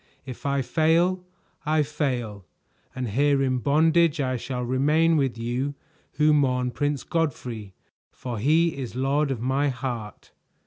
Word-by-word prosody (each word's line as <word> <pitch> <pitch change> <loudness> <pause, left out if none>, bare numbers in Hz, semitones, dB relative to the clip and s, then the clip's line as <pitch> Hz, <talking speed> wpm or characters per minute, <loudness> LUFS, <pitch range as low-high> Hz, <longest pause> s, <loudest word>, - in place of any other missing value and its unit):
If 130 +1 -7
I 140 -1 +1
fail, 170 +5 +2 0.4
I 155 0 +2
fail, 125 -9 -3 0.5
and 125 -2 -3
here 140 +5 +2
in 130 -1 0
bondage 160 +4 +3
I 130 -2 0
shall 125 +1 -4
remain 150 +6 +2
with 135 -6 0
you 125 +5 -2 0.4
who 150 +1 +3
mourn 125 -3 +1
Prince 145 +2 -2
Godfrey, 120 - -3 0.4
for 120 -4 -6
he 160 +7 +2
is 130 -4 -6
lord 140 +3 +1
of 130 -4 -3
my 135 +3 +1
heart." 125 -5 -6
135 Hz, 140 wpm, -25 LUFS, 125-150 Hz, 0.5 s, bondage